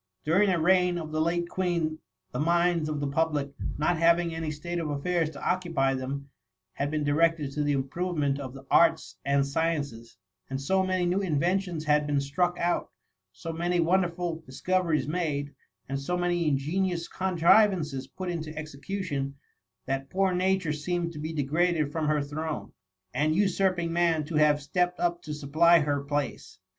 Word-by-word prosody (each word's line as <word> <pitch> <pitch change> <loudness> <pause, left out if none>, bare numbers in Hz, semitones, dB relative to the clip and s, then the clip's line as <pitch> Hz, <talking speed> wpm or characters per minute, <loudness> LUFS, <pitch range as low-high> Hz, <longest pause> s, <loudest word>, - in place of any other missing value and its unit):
During 190 +6 +4
the 180 -2 +2
reign 180 +1 +3
of 155 -2 -5
the 155 0 0
late 170 +1 0
Queen, 170 -4 -1 0.3
the - - -4
minds 170 0 +2
of 150 -1 -2
the 145 - -1
pub 160 +2 +1
lic 140 -1 -2 0.3
not 160 +2 +1
having 170 0 +3
any 160 -1 -3
state 170 +3 -4
affairs 160 +2 -1
to 140 - -7
occupy 165 -7 +1
them, 135 +1 -5 0.4
had 140 - -2
been 155 0 -1
directed 150 0 +2
to 150 - -2
the 145 0 +1
improvement 145 +1 -1
of 135 -2 -7
the 135 0 -11
arts 165 -1 +3
and 140 0 +2
sciences; 140 -6 -2 0.3
and 135 0 -3
so 190 +8 +1
many 185 -1 0
new 180 +3 +1
inventions 175 0 0
had 150 0 +3
been 145 -1 +1
struck 175 +6 0
out, 175 0 0 0.4
so 165 - -6
many 175 +2 0
wonderful 170 -1 +1
dis 130 - -10
coveries 170 -7 +1
made, 150 -4 -2 0.3
and 135 +1 -2
so 180 +6 -1
many 175 -2 0
ingenious 170 +5 0
contri 190 +3 +4
vances 150 -8 -4
put 185 - -4
into 160 -3 -4
execution, 145 -2 -4 0.5
that 135 +1 -3
poor 190 0 +1
Nature 185 -3 +1
seemed 170 +3 -2
to 150 - -8
be 155 +2 -4
degraded 155 +1 +1
from 155 -1 -1
her 150 -1 +2
throne, 155 +2 -5 0.4
and 155 +1 +1
usurping 185 -3 +1
man 170 -2 +2
to 165 - -8
have 150 -1 +4
stepped 180 +4 0
up 175 0 0
to 155 - -7
supply 155 +4 +4
her 145 -1 0
place. 145 -5 -3
160 Hz, 175 wpm, -28 LUFS, 145-175 Hz, 0.5 s, During